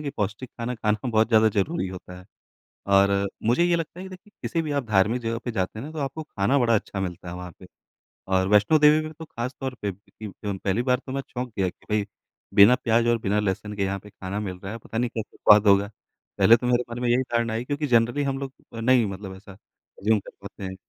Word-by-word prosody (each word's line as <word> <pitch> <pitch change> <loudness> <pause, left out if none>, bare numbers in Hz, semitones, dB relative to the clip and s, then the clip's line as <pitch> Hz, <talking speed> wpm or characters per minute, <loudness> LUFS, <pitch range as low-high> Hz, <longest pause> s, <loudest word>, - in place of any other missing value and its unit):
कि 140 - -3
पौष्टिक 105 +5 -3
ख़ाना 120 +1 -4
ख़ाना 110 +1 -1
बहुत 110 -1 +2
ज़्यादा 110 -1 +5
ज़रूरी 95 -2 -1
होता 90 -1 -9
है। 90 - -14 0.7
और 100 0 +4 0.2
मुझे 125 +9 +3
ये 175 0 +3
लगता 165 +1 -5
है 185 - -7
कि - - -8
देखिए 190 +3 -13
किसी 165 - -1
भी 155 -2 -4
आप - - -5
धार्मिक 110 +3 +2
जगह 115 0 -2
पे 120 - -2
जाते 95 +1 -2
हैं 130 - -6
ना 155 - -8
तो 160 - -9
आपको 140 +3 -4
ख़ाना 120 +1 0
बड़ा 115 -2 +3
अच्छा 100 -1 -3
मिलता 90 -1 -5
है 90 - -6
वहाँ 90 -1 -7
पे। 90 - -13 0.6
और 95 0 +2
वैष्णो 105 +10 +4
देवी 150 +1 +6
के - - -2
लिए 155 - -7
तो 160 - -7
ख़ास 125 -2 -5
तौर 130 -1 -3
पे 105 - -1
इ 100 +2 -10
जो 100 -1 -2
पहली 100 +4 +1
बार 125 -1 +2
तो 130 - -7
मैं 135 +1 -2
चौंक 125 -1 -5
गया 95 -1 +2
कि - - -20
भई 105 -1 +1 0.5
बिना 100 +5 +8
प्याज़ 115 -1 +1
और 120 - +3
बिना 105 -1 0
लहसुन 105 +1 -2
के 100 - -1
यहाँ 100 0 -2
पे 105 - -14
ख़ाना 95 0 -5
मिल 95 -3 -4
रहा 95 - -5
है 115 - -5
पता 115 0 -7
नहीं 120 +1 +1
कैसे 110 -2 -6
स्वाद 105 0 +6
होगा। 100 0 +5 0.5
पहले 115 +1 +7
तो 125 - -3
मेरे 125 0 +2
मन 120 - -5
में 125 - 0
यही 120 +2 +3
धारणा 115 -2 -1
आई 115 +2 -2
क्योंकि 145 +2 -2
जनरली 120 +3 +2
हम 135 -1 -2
लोग 135 -1 -5 0.2
नहीं 120 +1 +3
मतलब 95 -1 -7
ऐसा 100 +1 -13
अज़्यूम 105 +2 -3
कर - - -12
पाते - - -10
हैं। 95 0 -5
110 Hz, 255 wpm, -25 LUFS, 100-125 Hz, 0.7 s, बिना